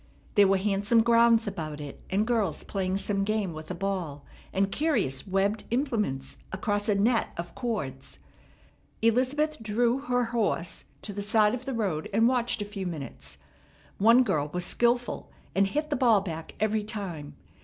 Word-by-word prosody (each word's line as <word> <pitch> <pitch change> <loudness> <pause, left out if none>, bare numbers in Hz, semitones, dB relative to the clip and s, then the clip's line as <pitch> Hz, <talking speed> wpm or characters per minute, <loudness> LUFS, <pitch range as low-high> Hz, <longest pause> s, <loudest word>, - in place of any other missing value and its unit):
There 205 -1 +6
were 195 0 +4
handsome 205 +3 +2
grounds 235 0 +5
about 155 -7 -4
it, 145 -1 -8
and 200 +3 +1
girls 220 -9 0
playing 190 -1 -1
some 200 0 -1
game 205 -4 -1
with 155 0 -9
a 180 - -3
ball 175 -7 -3 0.3
and 195 +1 +1
curious 280 - 0
webbed 195 +3 +1
implements 220 - -1
across 205 +2 -1
a 210 - +4
net 225 +4 +2
of 170 0 -5
cords. 145 - -4 0.9
Elizabeth 260 +6 +2
drew 235 +4 +1
her 245 -3 0
horse 200 -7 -1 0.2
to 205 - -2
the 205 - -4
side 210 0 +3
of 250 +1 -4
the 270 - -3
road, 190 -9 -1
and 225 +3 +4
watched 240 -3 +1
a - - -7
few 200 -2 -5
minutes. 70 - -7 0.6
One 230 +5 +6
girl 155 -10 0
was 180 +1 -2
skilful, 240 +3 0 0.2
and 195 +1 +3
hit 300 +9 -2
the - - +2
ball 235 -6 +4
back 165 -4 -6
every 215 0 +1
time. 190 -9 -6
205 Hz, 165 wpm, -28 LUFS, 180-235 Hz, 0.9 s, There